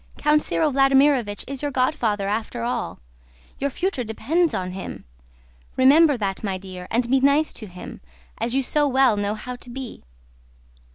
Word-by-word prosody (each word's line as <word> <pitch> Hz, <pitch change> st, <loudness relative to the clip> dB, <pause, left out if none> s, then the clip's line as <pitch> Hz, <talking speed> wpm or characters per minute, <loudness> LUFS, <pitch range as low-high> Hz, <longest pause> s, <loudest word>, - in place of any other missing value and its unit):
Count 300 Hz, 0 st, +3 dB
Cyril 310 Hz, 0 st, 0 dB
Vladímirovich 270 Hz, -5 st, +3 dB
is 275 Hz, -1 st, -5 dB
your 290 Hz, -, -1 dB
godfather 255 Hz, -7 st, 0 dB
after 225 Hz, +3 st, -3 dB
all, 240 Hz, -1 st, -2 dB
and -, -, -28 dB
your 280 Hz, -, +1 dB
future 345 Hz, -2 st, -2 dB
depends 295 Hz, +10 st, 0 dB
on 185 Hz, -1 st, -3 dB
him. 190 Hz, +1 st, -7 dB, 0.7 s
Remember 285 Hz, +2 st, +6 dB
that, 195 Hz, -2 st, -3 dB
my 195 Hz, -2 st, -2 dB
dear, 185 Hz, -1 st, -9 dB
and 235 Hz, +1 st, 0 dB
be 265 Hz, +2 st, +3 dB
nice 280 Hz, +3 st, +3 dB
to 215 Hz, -, -8 dB
him, 180 Hz, -1 st, -10 dB, 0.4 s
as 240 Hz, -, -1 dB
you 270 Hz, -, +2 dB
so 295 Hz, +3 st, +2 dB
well 265 Hz, -4 st, +4 dB
know 205 Hz, +1 st, -1 dB
how 250 Hz, +4 st, -7 dB
to 245 Hz, -, -12 dB
be." 255 Hz, -1 st, -7 dB
250 Hz, 170 wpm, -23 LUFS, 205-280 Hz, 0.7 s, Remember